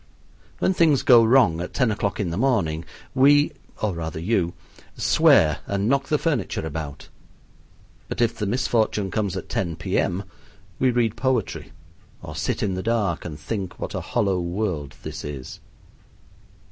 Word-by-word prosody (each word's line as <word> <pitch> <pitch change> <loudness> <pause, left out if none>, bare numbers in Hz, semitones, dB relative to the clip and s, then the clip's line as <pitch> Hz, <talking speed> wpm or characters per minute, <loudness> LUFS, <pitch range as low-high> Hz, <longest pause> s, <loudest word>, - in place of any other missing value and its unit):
When 190 - +2
things 160 -6 +3
go 120 -2 +7
wrong 110 -9 +4
at 90 - -6
ten 125 -4 +2
o'clock 105 -1 -2
in 95 -5 -1
the - - -2
morning 95 -10 +1 0.3
we 145 +2 +5 0.3
or 105 -3 +1
rather 80 -1 -5
you 90 -1 0 0.4
swear 75 -2 +4
and 100 +1 -1
knock 140 +2 +1
the 150 - +2
furniture 140 - -1
about; 80 0 -6 1.0
but - - -5
if 120 -2 +2
the 105 - -3
misfortune 110 -4 0
comes 100 -3 -1
at - - -6
ten 85 -4 -2
P.M., 90 +4 -1 0.6
we 130 - +3
read 120 -3 +1
poetry 130 -6 -1 0.5
or - - -7
sit - - -1
in 95 - 0
the 90 - -3
dark 105 -6 0
and 75 -3 -6
think 95 +2 -4
what - - -4
a - - -3
hollow 100 -6 0
world 85 -5 -3
this - - -6
is. 70 -3 -7
100 Hz, 160 wpm, -24 LUFS, 85-120 Hz, 1.0 s, go